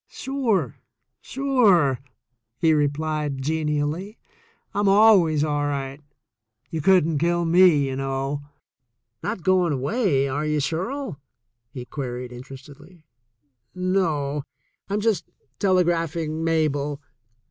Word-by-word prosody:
"Sure, 225 Hz, -, -1 dB, 0.4 s
sure," 215 Hz, -, +2 dB, 0.6 s
he 160 Hz, +1 st, +3 dB
replied 150 Hz, -1 st, -1 dB
genially; 155 Hz, -, -2 dB, 0.6 s
"I'm 205 Hz, -1 st, +2 dB
always 195 Hz, -7 st, +5 dB
all 145 Hz, -1 st, 0 dB
right. 140 Hz, 0 st, -4 dB, 0.7 s
You 160 Hz, -, -2 dB
couldn't 165 Hz, -3 st, +3 dB
kill 170 Hz, +2 st, +1 dB
me, 165 Hz, -4 st, +5 dB
you 135 Hz, -, -3 dB
know. 135 Hz, +1 st, -2 dB, 0.8 s
Not 210 Hz, -5 st, -4 dB
going 185 Hz, -4 st, +3 dB
away, 140 Hz, -, +1 dB
are 145 Hz, +3 st, -2 dB
you, 150 Hz, 0 st, 0 dB
Shirl 175 Hz, -, -3 dB, 0.2 s
?" 120 Hz, -1 st, -53 dB
he 125 Hz, -2 st, -6 dB
queried 125 Hz, -2 st, -5 dB
interestedly. 145 Hz, +6 st, -13 dB, 0.7 s
"No; 165 Hz, -6 st, 0 dB, 0.5 s
Vm 205 Hz, +1 st, -1 dB
just 220 Hz, -3 st, 0 dB, 0.3 s
telegraphing 170 Hz, -4 st, +1 dB
to 160 Hz, +1 st, -4 dB
Mabel. 150 Hz, -3 st, 0 dB
155 Hz, 105 wpm, -23 LUFS, 140-185 Hz, 0.8 s, always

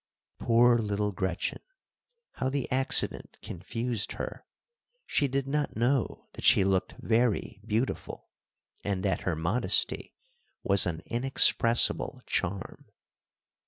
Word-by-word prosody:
Poor 120 Hz, +1 st, +3 dB
little 105 Hz, -1 st, -2 dB
Gretchen! 95 Hz, -2 st, -3 dB, 0.7 s
How 130 Hz, -, -3 dB
the 140 Hz, -1 st, -3 dB
accident 130 Hz, +1 st, +1 dB
confused 115 Hz, +5 st, -4 dB
her. -, -, -7 dB, 0.6 s
She 145 Hz, -, 0 dB
did 135 Hz, +1 st, -2 dB
not 145 Hz, +1 st, -2 dB
know 120 Hz, +2 st, -1 dB
that -, -, -10 dB
she -, -, +5 dB
looked 95 Hz, -1 st, -1 dB
very 115 Hz, -2 st, -1 dB
beautiful, 110 Hz, +4 st, -4 dB, 0.5 s
and 100 Hz, -2 st, -3 dB
that 95 Hz, -, -1 dB
her 90 Hz, -, -2 dB
modesty 85 Hz, +10 st, -1 dB, 0.5 s
was 100 Hz, -2 st, +4 dB
an 80 Hz, -2 st, -5 dB
inexpressible 120 Hz, -1 st, +3 dB
charm. 95 Hz, +1 st, -4 dB
115 Hz, 110 wpm, -28 LUFS, 95-125 Hz, 0.7 s, she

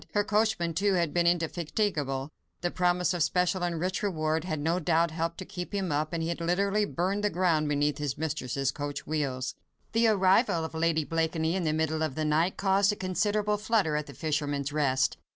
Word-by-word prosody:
Her 205 Hz, -, +3 dB
coachman, 210 Hz, -5 st, +1 dB
too, 200 Hz, +4 st, +2 dB
had 170 Hz, -4 st, +1 dB
been 175 Hz, -1 st, +2 dB
indefatigable; 160 Hz, -4 st, -1 dB, 0.3 s
the 175 Hz, -, -1 dB
promise 180 Hz, 0 st, +1 dB
of 175 Hz, -, -2 dB
special 180 Hz, +3 st, +1 dB
and 175 Hz, -2 st, -1 dB
rich 185 Hz, +3 st, -1 dB
reward 160 Hz, -5 st, -1 dB
had 155 Hz, -4 st, -2 dB
no 165 Hz, +4 st, 0 dB
doubt 165 Hz, 0 st, +2 dB
helped 165 Hz, +1 st, -2 dB
to 185 Hz, -, -6 dB
keep 180 Hz, +3 st, -6 dB
him 190 Hz, -4 st, -1 dB
up, 150 Hz, +1 st, 0 dB
and 165 Hz, -1 st, -2 dB
he 165 Hz, -, -2 dB
had 170 Hz, 0 st, -3 dB
literally 200 Hz, +5 st, +1 dB
burned 195 Hz, +2 st, -1 dB
the 210 Hz, -, +3 dB
ground 170 Hz, -5 st, +1 dB
beneath 145 Hz, 0 st, +1 dB
his 145 Hz, -3 st, -2 dB
mistress' 140 Hz, -3 st, -1 dB
coach 145 Hz, 0 st, -5 dB
wheels. 135 Hz, -4 st, -2 dB, 0.4 s
The 230 Hz, 0 st, +3 dB
arrival 190 Hz, -4 st, +3 dB
of 160 Hz, -, -7 dB
Lady 160 Hz, -1 st, +1 dB
Blakeney 165 Hz, +1 st, 0 dB
in 185 Hz, -3 st, -1 dB
the 155 Hz, -, +2 dB
middle 160 Hz, 0 st, 0 dB
of 155 Hz, -4 st, -1 dB
the 155 Hz, -, -1 dB
night 160 Hz, +4 st, +1 dB
caused 195 Hz, +1 st, +3 dB
a -, -, -3 dB
considerable 205 Hz, +2 st, 0 dB
flutter 210 Hz, -7 st, +1 dB
at 150 Hz, 0 st, -2 dB
"The 140 Hz, -, -11 dB
Fisherman's 145 Hz, -2 st, -2 dB
Rest." 135 Hz, -3 st, +1 dB
165 Hz, 205 wpm, -28 LUFS, 155-185 Hz, 0.4 s, Her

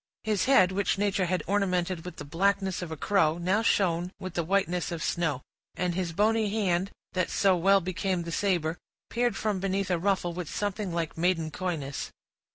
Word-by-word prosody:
His 210 Hz, -3 st, +1 dB
head, 255 Hz, -9 st, +5 dB
which 200 Hz, +1 st, 0 dB
nature 200 Hz, -2 st, +1 dB
had 185 Hz, +1 st, 0 dB
ornamented 185 Hz, -3 st, 0 dB
with 180 Hz, -, -7 dB
the -, -, -8 dB
blackness 190 Hz, +4 st, 0 dB
of 175 Hz, -, -5 dB
a 160 Hz, -, -4 dB
crow, 165 Hz, -2 st, +2 dB
now 185 Hz, +5 st, +1 dB
shone 180 Hz, -5 st, +1 dB
with 185 Hz, -2 st, -6 dB
the 170 Hz, -, 0 dB
whiteness 180 Hz, -1 st, 0 dB
of 165 Hz, -2 st, -3 dB
snow; 150 Hz, -7 st, -1 dB, 0.3 s
and 180 Hz, 0 st, -1 dB
his 175 Hz, -1 st, -2 dB
bony 215 Hz, +4 st, +2 dB
hand, 195 Hz, -3 st, 0 dB, 0.2 s
that 185 Hz, -2 st, 0 dB
so 195 Hz, -2 st, +3 dB
well 195 Hz, +3 st, +4 dB
became 185 Hz, 0 st, -1 dB
the 170 Hz, -, -6 dB
saber, 170 Hz, -3 st, 0 dB, 0.3 s
peered 240 Hz, 0 st, +1 dB
from 210 Hz, -3 st, -1 dB
beneath 195 Hz, 0 st, -1 dB
a 175 Hz, -, +1 dB
ruffle 185 Hz, -2 st, 0 dB
with 175 Hz, -2 st, -5 dB
something 205 Hz, -1 st, -2 dB
like 165 Hz, -1 st, -3 dB
maiden 165 Hz, -2 st, +1 dB
coyness. 155 Hz, -6 st, -3 dB
185 Hz, 185 wpm, -28 LUFS, 170-200 Hz, 0.3 s, head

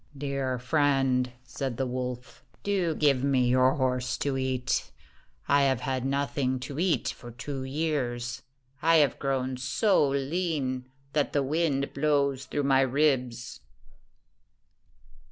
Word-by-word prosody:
"Dear 135 Hz, -2 st, -2 dB
friend," 135 Hz, -2 st, +2 dB
said 125 Hz, -1 st, -4 dB
the 135 Hz, -, 0 dB
wolf, 125 Hz, 0 st, -5 dB, 0.2 s
"do 185 Hz, -5 st, 0 dB
give 140 Hz, -4 st, +2 dB
me 130 Hz, -3 st, +3 dB
your 130 Hz, +1 st, +4 dB
horse 125 Hz, -2 st, 0 dB
to 140 Hz, -2 st, -1 dB
eat. 130 Hz, -1 st, -1 dB, 0.6 s
I 140 Hz, 0 st, +4 dB
have 135 Hz, -3 st, +2 dB
had 130 Hz, -1 st, -2 dB
nothing 135 Hz, -1 st, 0 dB
to 140 Hz, +3 st, -5 dB
eat 180 Hz, -1 st, +1 dB
for 120 Hz, -, -8 dB
two 130 Hz, +3 st, -5 dB
years. 130 Hz, -5 st, -2 dB, 0.4 s
I 165 Hz, +1 st, +4 dB
have 150 Hz, -3 st, +3 dB
grown 130 Hz, -2 st, -1 dB
so 140 Hz, -, +2 dB
lean 140 Hz, -3 st, -1 dB, 0.2 s
that 150 Hz, -2 st, +1 dB
the 145 Hz, -, +2 dB
wind 140 Hz, -1 st, 0 dB
blows 140 Hz, -2 st, +1 dB
through 145 Hz, +3 st, -2 dB
my 135 Hz, -1 st, +4 dB
ribs." 130 Hz, -3 st, 0 dB
135 Hz, 130 wpm, -28 LUFS, 130-145 Hz, 0.6 s, your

